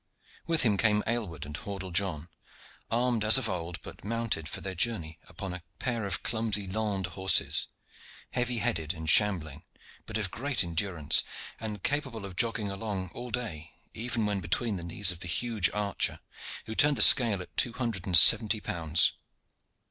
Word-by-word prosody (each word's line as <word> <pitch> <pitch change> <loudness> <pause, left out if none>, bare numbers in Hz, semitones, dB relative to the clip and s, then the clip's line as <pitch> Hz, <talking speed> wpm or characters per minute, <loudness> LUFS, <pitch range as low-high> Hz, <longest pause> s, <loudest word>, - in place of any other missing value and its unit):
With 165 -2 +2
him 105 -5 +1
came 105 0 +2
Aylward 105 -11 -4
and 75 0 -8
Hordle 95 +1 -7
John, 85 -4 -2 0.6
armed 120 -1 0
as 110 +4 +8
of 130 -3 0
old, 85 -3 -5
but - - -11
mounted 110 -7 -3
for - - -6
their 95 - -6
journey 85 -5 -3
upon 95 -2 -7
a 90 - -7 0.2
pair 115 -5 -3
of 95 - -3
clumsy 110 -3 -1
Landes 95 -2 -3
horses, 95 0 +2 0.6
heavy 125 -1 -1
headed 85 -5 -2
and 80 0 -8
shambling, 80 -6 +3 0.5
but 110 - -3
of 105 -4 -3
great 135 -3 0
endurance, 85 -2 +2 0.4
and 105 -3 -6
capable 135 -7 -3
of 95 -2 -10
jogging 110 -1 0
along 95 -3 -5
all 125 +1 -8
day, 105 -11 -5 0.2
even 115 -1 -2
when 105 -1 -1
between 100 +6 -2
the 85 - -7
knees 90 +3 +1
of 90 - -10
the 90 - -4
huge 110 0 +1
archer, 105 -2 -2 0.5
who 110 - -7
turned 145 +4 +3
the - - +8
scale 115 -6 +6
at 90 - -11
two 120 - +2
hundred 110 -6 -3
and 90 -2 +7
seventy 110 +4 +7
pounds. 80 -4 +2
100 Hz, 170 wpm, -28 LUFS, 90-115 Hz, 0.6 s, as